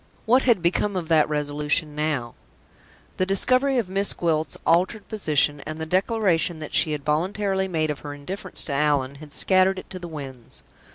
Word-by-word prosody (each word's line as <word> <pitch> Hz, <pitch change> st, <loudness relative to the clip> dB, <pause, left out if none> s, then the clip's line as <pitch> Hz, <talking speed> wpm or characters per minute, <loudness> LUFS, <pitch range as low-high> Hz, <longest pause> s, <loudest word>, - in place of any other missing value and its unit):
What 250 Hz, +4 st, +4 dB
had 225 Hz, -8 st, +3 dB
become 190 Hz, +4 st, +1 dB
of 170 Hz, -3 st, -3 dB
that 155 Hz, -2 st, +4 dB
resolution 150 Hz, +1 st, -1 dB
now? 150 Hz, -6 st, -2 dB, 0.8 s
The 185 Hz, -, +1 dB
discovery 255 Hz, +7 st, +2 dB
of 230 Hz, -6 st, 0 dB
Miss 195 Hz, +2 st, +2 dB
Gwilt's 160 Hz, -2 st, -1 dB
altered 185 Hz, +6 st, +2 dB
position, 150 Hz, -8 st, +1 dB
and 155 Hz, 0 st, -5 dB
the 160 Hz, -, -3 dB
declaration 185 Hz, -2 st, +1 dB
that 155 Hz, -1 st, -8 dB
she 155 Hz, -, +2 dB
had 145 Hz, -2 st, -5 dB
voluntarily 190 Hz, +5 st, 0 dB
made 160 Hz, -4 st, 0 dB
of 145 Hz, -, -6 dB
her 145 Hz, -1 st, -7 dB
indifference 185 Hz, +6 st, -4 dB
to 145 Hz, -, -4 dB
Allan, 140 Hz, -2 st, +1 dB
had 150 Hz, -1 st, -11 dB
scattered 190 Hz, +4 st, +3 dB
it 185 Hz, -, -9 dB
to 185 Hz, -, -6 dB
the 175 Hz, -, -7 dB
winds. 135 Hz, -7 st, -9 dB
165 Hz, 180 wpm, -24 LUFS, 150-190 Hz, 0.8 s, What